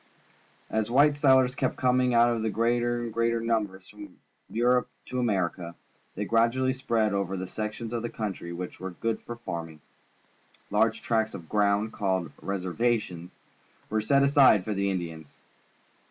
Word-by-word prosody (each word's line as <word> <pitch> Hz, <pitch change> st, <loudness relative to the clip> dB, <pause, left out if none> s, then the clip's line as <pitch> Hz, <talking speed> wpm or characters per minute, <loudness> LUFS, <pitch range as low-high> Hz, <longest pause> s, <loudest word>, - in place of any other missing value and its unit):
As 110 Hz, 0 st, 0 dB
white 145 Hz, +4 st, +4 dB
settlers 130 Hz, -3 st, +4 dB
kept 130 Hz, -1 st, -1 dB
coming 125 Hz, 0 st, +2 dB
out 120 Hz, 0 st, +5 dB
in 110 Hz, -1 st, -1 dB
greater 120 Hz, +1 st, 0 dB
and 115 Hz, -2 st, -5 dB
greater 115 Hz, 0 st, +1 dB
numbers 105 Hz, -5 st, -2 dB
from 105 Hz, -3 st, -12 dB, 0.3 s
P^urope 125 Hz, +2 st, +2 dB, 0.2 s
to 125 Hz, -, -4 dB
America, 90 Hz, -6 st, -1 dB, 0.4 s
they 105 Hz, -, -3 dB
gradually 115 Hz, +4 st, +2 dB
spread 115 Hz, -5 st, 0 dB
over 100 Hz, -1 st, -1 dB
the 95 Hz, -, -4 dB
sections 110 Hz, +4 st, -5 dB
of 120 Hz, -, -1 dB
the 120 Hz, -, -3 dB
country 100 Hz, -7 st, -5 dB
which 90 Hz, +1 st, -6 dB
were 95 Hz, -, -5 dB
good 115 Hz, +5 st, -3 dB
for 120 Hz, -, -7 dB
farming. 85 Hz, -9 st, -6 dB, 0.9 s
Large -, -, +2 dB
tracts 110 Hz, -1 st, 0 dB
of 85 Hz, -3 st, -9 dB
ground, 105 Hz, +2 st, +1 dB
called 95 Hz, -6 st, -1 dB
"reservations," 95 Hz, -2 st, -2 dB, 0.6 s
were 110 Hz, 0 st, +1 dB
set 140 Hz, +6 st, +3 dB
aside 140 Hz, -8 st, +5 dB
for 110 Hz, -, -2 dB
the 100 Hz, 0 st, 0 dB
Indians. 80 Hz, -5 st, -5 dB
110 Hz, 155 wpm, -27 LUFS, 95-120 Hz, 0.9 s, out